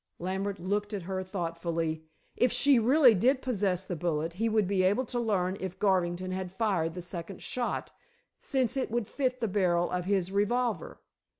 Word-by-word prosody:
Lambert 190 +3 -2
looked 205 +4 -1
at 195 - -5
her 185 +1 -3
thoughtfully. 165 -3 -3 0.3
If 250 - +3
she 280 -3 +4
really 255 +2 +6
did 255 +7 +3
possess 195 -8 -1
the 180 - -3
bullet 165 0 -1
he 225 +6 0
would 215 -3 +2
be 195 -1 +1
able 205 +8 +2
to 240 0 -3
learn 195 -5 0
if 190 -1 -5
Garvington 185 -2 +1
had 185 -1 -4
fired 185 -6 0
the 180 - -5
second 175 +1 -7
shot, 245 -1 -3 0.5
since 260 -4 0
it 265 - -1
would 235 -1 -1
fit 255 +1 -2
the 225 - +1
barrel 180 -3 +1
of 180 -1 -2
his 190 -2 0
revolver. 210 -1 0
190 Hz, 180 wpm, -29 LUFS, 180-225 Hz, 0.5 s, really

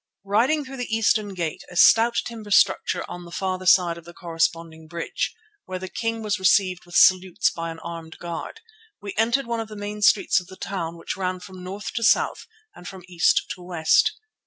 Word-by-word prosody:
Riding 250 +9 +2
through 270 +1 -9
the 240 -3 -2
eastern 210 -2 +1
gate, 170 -3 -3
a 180 - -12
stout 230 +6 +6
timber 225 -3 -8
structure 195 -1 +3
on 175 - -8
the 170 - -12
farther 185 0 -3
side 175 -2 +4
of - - -16
the 170 +1 -13
corresponding 165 -2 -2
bridge, 170 +1 -3 0.3
where 185 0 -5
the 185 +1 -6
king 225 +1 -3
was 210 -1 -1
received 185 -2 +2
with 175 - -10
salutes 185 -1 +4
by 165 0 -5
an 165 - -7
armed 165 -1 -8
guard, 175 - -7 0.4
we 200 -1 -7
entered 235 +5 +1
one 235 -1 -2
of 225 - -4
the 215 - -10
main 205 0 -6
streets 195 -3 +4
of 180 - -13
the 190 - -12
town 170 -3 -4
which 165 - -5
ran 185 -1 -2
from 185 0 -11
north 195 +3 -6
to 235 - -3
south 225 - +2 0.3
and 180 - -12
from 190 -2 -9
east 175 -2 +2
to 180 - -7
west. 175 -3 +2
185 Hz, 205 wpm, -24 LUFS, 170-210 Hz, 0.4 s, stout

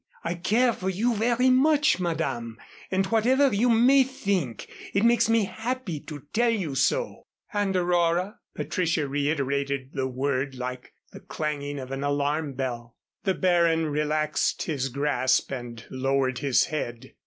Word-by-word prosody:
I 170 - -1
care 225 +8 +2
for 190 -2 -3
you 220 +6 +1
very 240 +4 +2
much, 295 0 +4
Madame, 155 -10 -2 0.3
and 190 0 +1
whatever 245 +5 +3
you 230 +5 +2
may 245 +4 +6
think, 200 - -2 0.3
it 200 +3 +3
makes 235 -1 +4
me 225 -1 +4
happy 220 - -4
to 145 -2 -9
tell 240 +1 +3
you 190 -11 -1
so." 485 - 0 0.3
"And 205 -2 0
Aurora?" 175 +3 +1 0.2
Patricia 165 -5 -1
reiterated 140 -1 -1
the 135 -2 -1
word, 135 +1 -2
like 125 0 -6 0.2
the - - -10
clanging 145 -2 -4
of 130 -1 -7
an 135 +1 -3
alarm 145 +1 0
bell. 120 -3 -5 0.3
The 190 -2 +2
Baron 170 -3 +2
relaxed 150 +1 0
his 135 -5 -2
grasp 130 -1 +1
and 120 -3 -6
lowered 130 -1 0
his 140 -3 +3
head. 120 -7 -5
160 Hz, 145 wpm, -26 LUFS, 135-210 Hz, 0.3 s, may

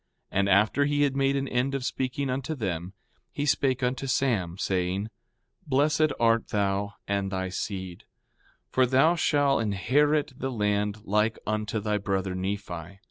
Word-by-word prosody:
4:11 - - +2
And 100 0 +2
after 105 +9 +4
he 145 0 +1
had 140 -2 +1
made 135 0 +2
an 135 0 -1
end 130 +2 0
of 130 -2 -3
speaking 130 +1 -2
unto 135 +4 -2
them, 95 - -3 0.4
he 145 - -2
spake 135 -2 +1
unto 130 +2 -1
Sam, 115 -10 0
saying: 95 +3 -1 0.6
Blessed 150 +2 +3
art 115 -1 +3
thou, 100 0 -1
and 100 -1 -1
thy 95 -1 -2
seed; 95 -2 -5 0.7
for 130 -1 +3
thou 135 +6 +4
shall 145 -4 +2
inherit 135 +8 +1
the 135 0 -3
land 105 -1 -1
like 105 +3 +1
unto 110 +1 -1
thy 105 0 -1
brother 95 -1 -1
Nephi. 95 -2 -5
110 Hz, 155 wpm, -27 LUFS, 100-135 Hz, 0.7 s, after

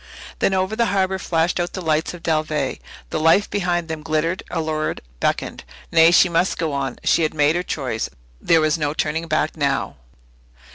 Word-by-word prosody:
Then 190 - +2
over 190 +3 0
the 235 0 +2
harbour 190 -1 0
flashed 170 0 0
out 175 0 -2
the - - -4
lights 160 +1 0
of 170 - -13
Dalveigh. 155 -2 0 0.3
The - - -1
life 165 +6 +4
behind 175 -4 -1
them 160 -1 -5
glittered, 160 +3 -1
allured, 155 -1 -2 0.2
beckoned. - - -1 0.3
Nay, 165 0 +7
she 175 +2 +6
must 175 +2 +1
go 160 -3 -2
on 135 -1 -2
she - - +3
had 155 -1 0
made 150 +1 +3
her 175 - +1
choice. 130 -10 -3 0.3
There 165 -1 +4
was 155 +1 +1
no 150 0 -1
turning 160 +2 -1
back 155 -1 0
now. 140 -3 -1
160 Hz, 185 wpm, -21 LUFS, 155-175 Hz, 0.3 s, Nay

